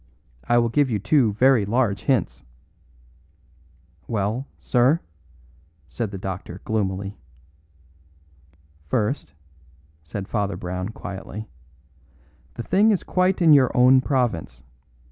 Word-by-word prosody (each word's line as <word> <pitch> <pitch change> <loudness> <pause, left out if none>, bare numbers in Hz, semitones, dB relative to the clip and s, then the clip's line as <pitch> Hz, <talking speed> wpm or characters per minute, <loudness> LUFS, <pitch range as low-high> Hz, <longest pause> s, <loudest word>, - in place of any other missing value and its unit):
I 120 - +3
will 120 -1 +2
give 140 +3 +2
you 110 - 0
two 110 +2 +2
very 130 +1 +4
large 105 -1 0
hints." 130 -9 0 1.6
"Well, 110 +5 -2
sir?" 130 +6 +2 0.9
said 105 +10 -4
the 100 - -7
doctor 95 -1 -6
gloomily. 100 -3 -2 1.7
"First," 105 - -1 0.7
said 95 +5 -6
Father 100 -4 -2
Brown 90 +2 -4
quietly, 105 0 -8 1.1
"the 120 - -5
thing 205 - +3
is 205 -4 +1
quite 185 0 +1
in 160 -2 +7
your 135 -4 +5
own 130 +1 +6
province. 110 - -2
110 Hz, 105 wpm, -23 LUFS, 95-130 Hz, 1.7 s, in